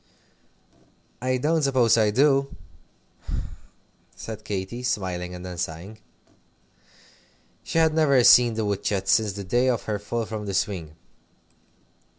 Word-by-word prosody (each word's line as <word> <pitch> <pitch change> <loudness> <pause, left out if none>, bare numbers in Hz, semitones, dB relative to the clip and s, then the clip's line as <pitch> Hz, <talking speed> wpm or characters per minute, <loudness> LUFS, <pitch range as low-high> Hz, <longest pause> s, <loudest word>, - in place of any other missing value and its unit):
"I 130 0 0
don't 155 +5 +1
suppose 130 -5 +3
I 110 -2 +3
do," 135 +4 +2 1.6
said 110 -1 -8
Katy, 100 +3 -5
smiling, 90 -6 -3
and 90 +1 -9
then 90 -2 -7
sighing. 90 +7 -6 1.6
She - - -4
had 160 -1 +3
never 140 -5 +3
seen 120 -1 +6
the 110 -1 -1
wood 100 -1 -2
shed 95 -2 -2
since 105 +1 +2
the 100 0 -6
day 120 +7 +1
of 120 -3 -1
her 105 -2 -3
fall 115 +3 -3
from 105 -1 -6
the 100 - -3
swing. 85 -7 -2
110 Hz, 135 wpm, -24 LUFS, 95-125 Hz, 1.6 s, seen